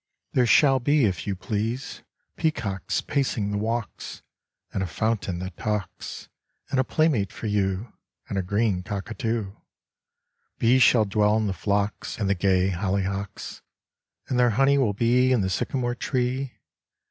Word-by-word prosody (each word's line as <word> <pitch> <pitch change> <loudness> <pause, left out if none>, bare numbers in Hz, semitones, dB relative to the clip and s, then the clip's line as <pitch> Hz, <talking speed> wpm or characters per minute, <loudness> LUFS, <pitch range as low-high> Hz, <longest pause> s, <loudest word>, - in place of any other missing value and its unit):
There 125 -2 +3
shall 135 +2 +5
be 145 +1 +3
if 95 -3 -2
you 100 - -1
please 110 - -3 0.3
Peacocks 105 - -1
pacing 120 -7 -1
the 105 - -1
walks, 115 +1 -4 0.5
And 95 - -1
a 95 - -1
fountain 105 -1 -1
that 90 -1 -6
talks, 105 -5 -4 0.4
And 135 - +2
a - - +4
playmate 130 - +1
for - - -8
you, 100 +1 -1 0.3
And - - -4
a 95 - +1
green 100 0 0
cockatoo. 110 +2 -3 1.1
Bees 125 +3 +4
shall 115 -2 +6
dwell 105 +1 +2
in 110 - +1
the 100 - -1
phlox 100 +3 -1
And 105 - -1
the 100 - +3
gay 95 0 +2
hollyhocks, 95 +1 -3 0.7
And 125 - 0
their 120 -1 +5
honey 135 +5 +3
will 115 -6 +2
be 125 +4 +3
In 125 -4 +3
the 95 0 -1
sycamore 120 +5 -1
tree. 125 +1 -2
105 Hz, 150 wpm, -25 LUFS, 100-125 Hz, 1.1 s, shall